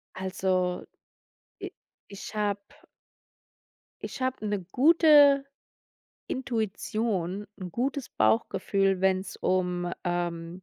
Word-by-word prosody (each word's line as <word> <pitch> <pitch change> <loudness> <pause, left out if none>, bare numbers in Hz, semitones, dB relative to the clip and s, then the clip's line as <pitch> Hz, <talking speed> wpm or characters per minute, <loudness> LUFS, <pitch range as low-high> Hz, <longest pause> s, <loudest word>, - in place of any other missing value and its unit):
Also, 185 -1 -1 0.8
i - - -5 0.4
ich 200 +1 -9
hab 205 -1 0 1.5
Ich - - -8
habe 255 -4 -2
'ne 205 -1 -1
gute 290 -1 +6 0.8
Intuition, 215 -5 -2
'n 180 -1 -6
gutes 265 - -2
Bauchgefühl, 190 - +1
wenn's 190 0 0
um, 180 -1 -1
ähm 175 0 -3
195 Hz, 85 wpm, -27 LUFS, 180-235 Hz, 1.5 s, gute